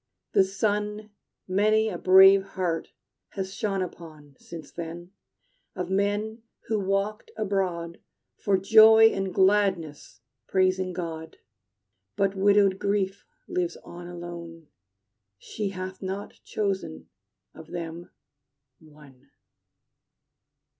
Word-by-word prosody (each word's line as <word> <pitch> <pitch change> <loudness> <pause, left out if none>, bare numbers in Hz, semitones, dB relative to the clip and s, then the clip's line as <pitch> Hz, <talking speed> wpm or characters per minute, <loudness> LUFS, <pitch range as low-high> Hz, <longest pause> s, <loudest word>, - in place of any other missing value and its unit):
The 195 - +5
sun 210 +2 -2 0.4
Many 215 +3 +2
a 205 - -3
brave 190 +1 +7 0.2
heart 170 -3 -1 0.5
has 190 -1 -4
shone 195 -3 -1
upon 155 -5 -11
Since 165 -2 -10
then, 170 +1 -8 0.6
of 180 0 -4
men 205 +3 -1 0.2
who 220 -2 -1
walked 195 +2 -2
abroad 185 -5 -2 0.4
For 200 -2 +1
joy 220 +3 +7
and 195 -1 -3
gladness 190 - +1 0.3
praising 185 -1 +1
God. 160 -2 -6 0.8
But 195 -1 +1
widowed 200 -1 +3
Grief 200 -1 -1 0.2
lives 175 -1 -2
on 175 0 -10
alone: 170 -2 -9 0.7
She 205 - -5
hath 185 0 -7
not 195 +1 -5
chosen, 195 - -3 0.5
of 160 - -12
them, 170 0 -7 0.7
one. 145 -4 -19
190 Hz, 100 wpm, -26 LUFS, 170-200 Hz, 0.8 s, brave